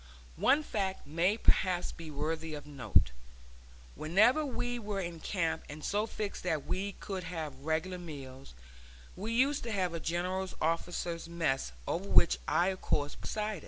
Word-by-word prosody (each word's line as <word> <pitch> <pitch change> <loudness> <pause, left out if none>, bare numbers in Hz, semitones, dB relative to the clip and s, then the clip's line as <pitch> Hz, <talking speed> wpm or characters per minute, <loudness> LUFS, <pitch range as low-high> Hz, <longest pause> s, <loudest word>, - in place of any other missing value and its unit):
One 300 +2 +5
fact 195 -7 -2
may 170 +8 +2
perhaps 185 -5 +2
be 165 -2 -9
worthy 155 +2 -2
of 145 - -8
note. 125 - +2 0.8
Whenever 215 - +4
we 245 -3 -2
were 205 -3 -3
in 170 -3 -4
camp 165 -2 0
and 150 +1 -8
so 210 +2 +1
fixed 210 -2 -4
that 160 -6 -1
we 200 +2 -2
could 190 -2 -5
have 160 -5 -4
regular 165 +4 -1
meals, 135 - -9 0.6
we 210 +5 -3
used 270 +5 +3
to 230 - -2
have 185 -4 0
a 165 - -2
general 180 +3 -1
officers' 165 +1 -1
mess, 150 - 0 0.2
over 195 +3 -1
which 170 - +6
I 180 +2 +3
of 190 -1 -4
course 145 0 +1
presided. 215 -3 -3
175 Hz, 160 wpm, -32 LUFS, 155-200 Hz, 0.8 s, which